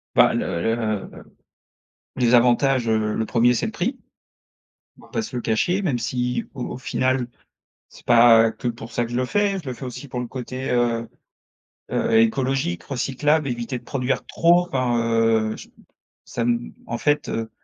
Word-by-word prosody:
Bah, -, -, +6 dB
le 85 Hz, -, -2 dB
le 110 Hz, -2 st, -2 dB, 0.9 s
les 125 Hz, -1 st, +2 dB
avantages, 125 Hz, +1 st, +3 dB
heu, 110 Hz, -1 st, +1 dB
le 110 Hz, -, -1 dB
1er, 120 Hz, +2 st, +3 dB
c'est 120 Hz, -, -1 dB
le 220 Hz, -, -3 dB
prix. 245 Hz, +9 st, -2 dB, 1.0 s
On -, -, -17 dB
va -, -, -21 dB
pas 225 Hz, -, -2 dB
se 220 Hz, -, -8 dB
le -, -, -1 dB
cacher 175 Hz, -, +1 dB
même 145 Hz, -10 st, 0 dB
si 125 Hz, -, -2 dB
au 130 Hz, -3 st, -5 dB
au -, -, -7 dB
final 130 Hz, -1 st, 0 dB, 0.6 s
c'est -, -, -17 dB
pas 115 Hz, -1 st, +6 dB
que 125 Hz, -, -4 dB
pour 115 Hz, 0 st, -7 dB
ça 120 Hz, -, 0 dB
que 115 Hz, -, -7 dB
je 120 Hz, -, -3 dB
le 130 Hz, -, +1 dB
fais, 200 Hz, +4 st, +1 dB
je 155 Hz, -8 st, -8 dB
le 125 Hz, -, -3 dB
fais 120 Hz, -, -9 dB
aussi 125 Hz, +3 st, -7 dB
pour 125 Hz, -1 st, -4 dB
le 125 Hz, -, -5 dB
côté, 130 Hz, +1 st, -5 dB
heu 120 Hz, -1 st, +1 dB, 0.8 s
heu, 110 Hz, -, +2 dB
écologique, 125 Hz, -5 st, 0 dB
recyclable, 145 Hz, +3 st, 0 dB
éviter 120 Hz, 0 st, -3 dB
de 120 Hz, -, -13 dB
produire 130 Hz, 0 st, -2 dB
trop, 175 Hz, +1 st, +3 dB
enfin, 130 Hz, -7 st, 0 dB
heu, 115 Hz, -1 st, +2 dB
je -, -, -11 dB, 0.6 s
ça 115 Hz, -, -3 dB
ne 120 Hz, 0 st, +2 dB, 0.3 s
en 120 Hz, -, -3 dB
fait, 145 Hz, +4 st, +1 dB
heu 115 Hz, 0 st, -3 dB
120 Hz, 185 wpm, -22 LUFS, 115-135 Hz, 1.0 s, Bah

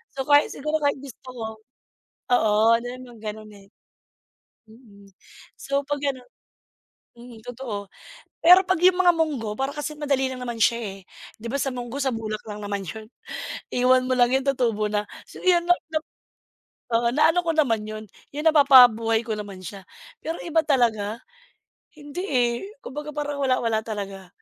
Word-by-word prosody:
So, 270 Hz, -, -2 dB
kahit 290 Hz, +1 st, +5 dB
siguro 305 Hz, +2 st, -2 dB
kahit 285 Hz, -1 st, +2 dB
gusto 265 Hz, -1 st, -12 dB
ko, 250 Hz, -3 st, -7 dB, 0.9 s
oo, 220 Hz, 0 st, +4 dB
din 245 Hz, +1 st, -7 dB
magganun, 215 Hz, -2 st, -8 dB
eh. 195 Hz, -1 st, -17 dB, 1.0 s
Mm. 210 Hz, -4 st, -18 dB, 0.5 s
So, 280 Hz, +1 st, -1 dB
'pag 290 Hz, 0 st, -3 dB
ganun 270 Hz, -3 st, -2 dB, 0.9 s
mm, 235 Hz, -1 st, -12 dB
totoo. 225 Hz, -5 st, -6 dB, 0.6 s
Pero 360 Hz, +3 st, +8 dB
'pag 370 Hz, -2 st, +1 dB
yung 370 Hz, 0 st, +5 dB
mga 355 Hz, -1 st, +6 dB
monggo, 275 Hz, -10 st, -1 dB
para 270 Hz, +4 st, -2 dB
kasi 300 Hz, +1 st, -4 dB
madali 275 Hz, -3 st, +1 dB
lang 255 Hz, -1 st, -6 dB
naman 235 Hz, -2 st, -5 dB
siya, 235 Hz, +2 st, +3 dB
eh. 195 Hz, -4 st, -6 dB, 0.4 s
Di 230 Hz, -, -7 dB
ba -, -, -2 dB
sa 270 Hz, -, 0 dB
monggo, 245 Hz, +2 st, -6 dB
sa 265 Hz, -, +1 dB
bulak 215 Hz, -1 st, -4 dB
lang 210 Hz, 0 st, -6 dB
naman 200 Hz, -1 st, -3 dB
yun? 215 Hz, +4 st, -8 dB, 0.7 s
Iwan 255 Hz, +1 st, +4 dB
mo 255 Hz, -, +2 dB
lang 245 Hz, 0 st, +4 dB
yun, 265 Hz, -, +3 dB
tutubo 230 Hz, -6 st, +1 dB
na. 210 Hz, 0 st, 0 dB, 0.2 s
So, -, -, -12 dB
'yon, 350 Hz, -2 st, +4 dB
nop 355 Hz, -, +6 dB, 0.2 s
nop 310 Hz, 0 st, -1 dB, 0.9 s
oo, 235 Hz, +1 st, +3 dB
naano 325 Hz, +4 st, +4 dB
ko 330 Hz, -, +2 dB
naman 230 Hz, -9 st, +1 dB
yun, 215 Hz, 0 st, -7 dB, 0.3 s
yung 300 Hz, +3 st, -4 dB
napapabuhay 245 Hz, -7 st, +6 dB
ko 220 Hz, -2 st, -2 dB
naman 200 Hz, -3 st, -8 dB
siya. 190 Hz, +2 st, -9 dB, 0.4 s
Pero 325 Hz, +2 st, -3 dB
iba 325 Hz, -1 st, +1 dB
talaga, 230 Hz, -6 st, +1 dB, 0.8 s
hindi, 290 Hz, +2 st, -8 dB
eh, 245 Hz, -6 st, +2 dB, 0.3 s
kumbaga, 295 Hz, +2 st, -7 dB
parang 290 Hz, -1 st, -3 dB
wala, 255 Hz, -1 st, +2 dB
wala 225 Hz, -2 st, +1 dB
talaga. 195 Hz, -3 st, -6 dB
250 Hz, 165 wpm, -24 LUFS, 220-290 Hz, 1.0 s, Pero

